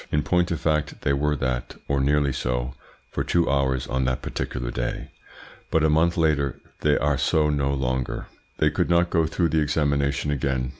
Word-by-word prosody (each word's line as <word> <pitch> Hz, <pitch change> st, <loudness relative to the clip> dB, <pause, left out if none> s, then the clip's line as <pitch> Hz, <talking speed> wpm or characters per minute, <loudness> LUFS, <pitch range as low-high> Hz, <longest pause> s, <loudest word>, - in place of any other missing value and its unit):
In 75 Hz, 0 st, +1 dB
point 90 Hz, -1 st, +2 dB
of 85 Hz, -, -2 dB
fact 75 Hz, -2 st, -1 dB
they 70 Hz, -, +1 dB
were 75 Hz, +2 st, +1 dB
that, 65 Hz, -3 st, -2 dB
or 70 Hz, -1 st, +1 dB
nearly 70 Hz, 0 st, +2 dB
so, 60 Hz, 0 st, -2 dB, 0.4 s
for -, -, -1 dB
two 85 Hz, -1 st, +1 dB
hours 65 Hz, -2 st, +1 dB
on 65 Hz, +1 st, -1 dB
that 65 Hz, 0 st, -1 dB
particular 60 Hz, -2 st, -3 dB
day, -, -, -4 dB, 0.6 s
but 80 Hz, -, +2 dB
a 80 Hz, -, +4 dB
month 80 Hz, +3 st, +3 dB
later 75 Hz, -4 st, +1 dB, 0.2 s
they -, -, +3 dB
are 70 Hz, -2 st, +1 dB
so 75 Hz, +2 st, +2 dB
no 70 Hz, -1 st, 0 dB
longer. 65 Hz, -2 st, -2 dB, 0.3 s
They -, -, +3 dB
could -, -, 0 dB
not 85 Hz, 0 st, +3 dB
go 80 Hz, -2 st, +2 dB
through 85 Hz, +1 st, 0 dB
the 80 Hz, +1 st, +2 dB
examination 70 Hz, -1 st, 0 dB
again. 65 Hz, -2 st, -1 dB
70 Hz, 190 wpm, -24 LUFS, 65-75 Hz, 0.6 s, a